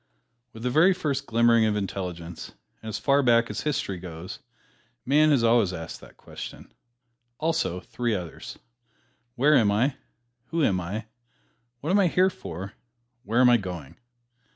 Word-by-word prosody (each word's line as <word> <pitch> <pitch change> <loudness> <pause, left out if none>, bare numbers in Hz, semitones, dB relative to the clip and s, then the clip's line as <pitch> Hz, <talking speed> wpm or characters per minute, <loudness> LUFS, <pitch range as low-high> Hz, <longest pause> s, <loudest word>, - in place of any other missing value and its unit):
With 110 - -11
the 125 - 0
very 175 +7 +5
first 140 -5 -2
glimmering 115 0 +4
of 105 -1 +1
intelligence, 90 -4 -5 0.3
and 110 - -7
as 105 - -3
far 140 +3 +3
back 120 -2 +3
as - - -4
history 120 -11 -2
goes, 85 0 -8 0.7
man 150 +4 +4
has 140 -6 +3
always 115 -5 +3
asked 80 -2 -7
that - - -16
question, - - -10 0.6
also 160 - -1
three 120 +1 -2
others: 90 -4 -7 0.8
Where 145 +5 +4
am 110 -6 +4
I? 125 +7 +1 0.5
Who 165 -1 0
am 95 -7 +2
I? 100 +5 -5 0.8
What 155 - -2
am 200 - +4
I 190 - +4
here 185 +3 +3
for? 95 - -8 0.5
Where 115 +5 +2
am 125 - +7
I 120 - +6
going? 90 - -7
115 Hz, 155 wpm, -26 LUFS, 95-140 Hz, 0.8 s, am